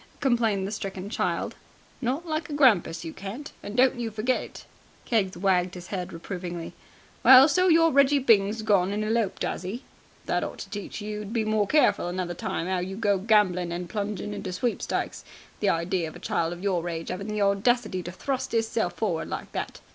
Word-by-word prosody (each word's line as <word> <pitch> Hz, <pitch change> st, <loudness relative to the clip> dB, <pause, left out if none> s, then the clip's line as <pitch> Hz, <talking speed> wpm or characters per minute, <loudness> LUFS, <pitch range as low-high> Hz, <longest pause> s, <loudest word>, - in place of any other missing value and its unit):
complained 230 Hz, -7 st, +1 dB
the -, -, -5 dB
stricken 195 Hz, -1 st, -5 dB
child. -, -, -1 dB, 0.5 s
"Not 270 Hz, +7 st, -1 dB
like 310 Hz, -1 st, -3 dB
a -, -, -5 dB
grampus 205 Hz, -, +3 dB
you 160 Hz, -, -6 dB
can't, 205 Hz, +9 st, -7 dB
and 205 Hz, +4 st, -7 dB
don't 255 Hz, 0 st, +4 dB
you 235 Hz, -1 st, -2 dB
forget 220 Hz, +4 st, 0 dB
it." -, -, -11 dB, 0.4 s
Keggs 200 Hz, -6 st, 0 dB
wagged 185 Hz, -1 st, +1 dB
his 180 Hz, 0 st, -9 dB
head 180 Hz, -2 st, -3 dB
reprovingly. 175 Hz, 0 st, -6 dB, 0.5 s
"Well, 260 Hz, +1 st, +9 dB
so 365 Hz, +4 st, +3 dB
your 330 Hz, -1 st, +5 dB
Reggie 280 Hz, +1 st, +5 dB
Byng's 220 Hz, -4 st, +3 dB
gone 200 Hz, -4 st, +3 dB
and 210 Hz, +1 st, -1 dB
eloped, 220 Hz, -2 st, 0 dB
has -, -, -2 dB
he! 205 Hz, +9 st, -5 dB, 0.4 s
That -, -, 0 dB
ought -, -, -5 dB
to -, -, -8 dB
teach 205 Hz, 0 st, -6 dB
you 210 Hz, 0 st, -4 dB
to 210 Hz, -, -6 dB
be 225 Hz, -1 st, -1 dB
more 215 Hz, -1 st, +1 dB
careful 300 Hz, -, +3 dB
another 175 Hz, 0 st, -3 dB
time 170 Hz, 0 st, -3 dB
'ow 185 Hz, -1 st, 0 dB
you 185 Hz, +2 st, -4 dB
go 205 Hz, -2 st, +1 dB
gambling 185 Hz, -4 st, +2 dB
and 175 Hz, +1 st, -4 dB
plunging 210 Hz, 0 st, -3 dB
into 200 Hz, -2 st, -5 dB
sweepstakes. 230 Hz, +6 st, -2 dB, 0.4 s
The 205 Hz, -, +2 dB
idea 170 Hz, 0 st, 0 dB
of 155 Hz, -, -10 dB
a -, -, -9 dB
child 165 Hz, 0 st, -1 dB
of 175 Hz, +2 st, -7 dB
your 175 Hz, -3 st, 0 dB
age 165 Hz, -1 st, -4 dB
'aving 190 Hz, +3 st, -5 dB
the 210 Hz, -1 st, 0 dB
audacity 200 Hz, 0 st, +1 dB
to 175 Hz, -, -6 dB
thrust 260 Hz, +6 st, -3 dB
'isself 225 Hz, -5 st, 0 dB
forward 175 Hz, -5 st, -2 dB
like -, -, -5 dB
that!" -, -, -5 dB
205 Hz, 200 wpm, -26 LUFS, 180-235 Hz, 0.5 s, Well